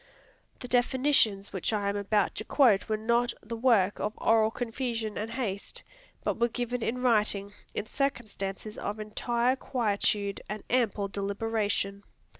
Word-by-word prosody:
The 250 - -5
definitions 245 -5 +2
which 190 +2 -1
I 205 -2 0
am 200 - 0
about 205 0 +1
to - - -4
quote 220 -8 +4
were 215 - +1
not 235 +2 +1
the 230 +2 -5
work 225 -5 +3
of 210 - -2
oral 220 -1 +4
confusion 230 -2 -3
and 215 +2 -3
haste, 225 -5 -4 0.4
but - - -1
were 235 - +4
given 245 +1 -3
in 250 +3 -2
writing, 210 -4 +2 0.2
in - - -2
circumstances 215 -6 -3
of 210 +2 -3
entire 235 +4 0
quietude 205 -5 0
and 210 0 -5
ample 220 -5 +2
deliberation. 200 0 -1
220 Hz, 145 wpm, -29 LUFS, 205-240 Hz, 0.4 s, quote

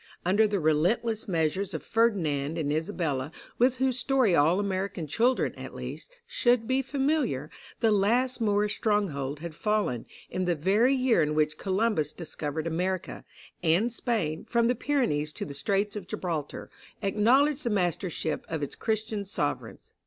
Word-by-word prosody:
Under 205 +5 +4
the 205 -1 0
relentless 180 +9 +1
measures 175 +2 0
of - - -5
Ferdinand 165 -10 +1
and 150 -3 0
Isabella, 155 -3 -2 0.3
with 250 +1 +4
whose 260 -1 +1
story 255 -6 +2
all 165 +4 +4
American 195 -3 -2
children, 235 - +1
at - - -9
least, - - -7 0.2
should 240 -2 +2
be 260 +1 +2
familiar, 270 - -1 0.3
the 225 - +4
last 235 +5 +2
Moorish 210 -1 +1
stronghold 150 -10 -1
had 170 -1 -6
fallen, 205 - -1 0.2
in 185 0 -1
the 175 -1 +1
very 205 - +3
year 255 -8 +3
in 150 0 0
which 155 0 +1
Columbus 190 -6 0
discovered 155 -2 -4
America, 180 +3 -2 0.4
and 180 +8 +2
Spain, 210 -11 -1
from 235 -1 +3
the 245 - +3
Pyrenees 235 - 0
to - - -5
the 140 - -7
Straits 200 +8 0
of 200 -4 -6
Gibraltar, 165 -7 -4 0.3
acknowledged 260 +9 +3
the 235 - 0
mastership 175 -5 -1
of 160 -2 -2
its 145 - -4
Christian 220 -1 -2
sovereigns. 160 -7 -4
195 Hz, 155 wpm, -28 LUFS, 160-230 Hz, 0.4 s, Under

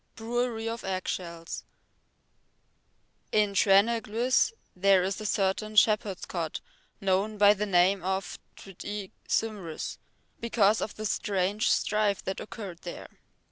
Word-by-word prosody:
Brewery 230 0 -2
of 230 0 -4
Eggshells 175 -3 -4 1.7
In 210 -2 +2
Treneglwys 225 - +3 0.2
there 190 0 +4
is 195 +3 -2
a 215 - -3
certain 205 +2 0
shepherd's 210 -3 +3
cot 165 -3 -3 0.4
known 195 +2 0
by 205 0 +7
the 210 +1 -2
name 185 +1 +4
of 190 -1 -2 0.2
Twt 195 -3 -11
y 205 -2 -5 0.2
Cymrws 200 -8 -2 0.4
because 220 -2 +2
of 215 - -4
the 215 - -5
strange 200 0 0
strife 210 -2 +1
that 190 - -3
occurred 200 -6 -7
there. 175 - -8
200 Hz, 120 wpm, -28 LUFS, 190-215 Hz, 1.7 s, by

